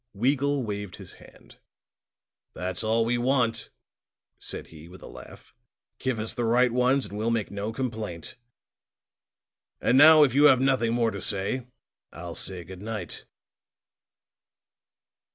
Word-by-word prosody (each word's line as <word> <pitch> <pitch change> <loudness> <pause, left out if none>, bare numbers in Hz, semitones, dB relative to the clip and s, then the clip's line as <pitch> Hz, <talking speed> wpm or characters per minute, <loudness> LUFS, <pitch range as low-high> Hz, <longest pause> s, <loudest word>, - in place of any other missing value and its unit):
Weagle 140 +4 +1
waved 105 -3 -5
his - - -10
hand. - - -18 1.0
"That's 90 +1 -3
all 115 +1 +1
we 120 +1 0
want," 120 -3 0 0.7
said - - -5
he 80 +1 -12
with 95 - -14
a - - -9
laugh. - - -13 0.5
"Give 130 -3 -2
us 110 +1 -4
the 120 - -3
right 120 +2 +3
ones 125 +3 +2
and 100 - -9
we'll 110 +2 -1
make 115 -3 -1
no 100 +2 -4
complaint. 110 -9 -5 1.4
And 130 - +3
now, 155 +1 +9
if 135 -5 +2
you 145 +2 +5
have 135 -4 +6
nothing 130 -4 +1
more 115 -1 +1
to 100 -2 -6
say, 105 +7 -1 0.4
I'll 85 +1 -8
say 90 0 -3
good 95 +1 -11
night." 110 0 -6
115 Hz, 140 wpm, -26 LUFS, 100-130 Hz, 1.4 s, now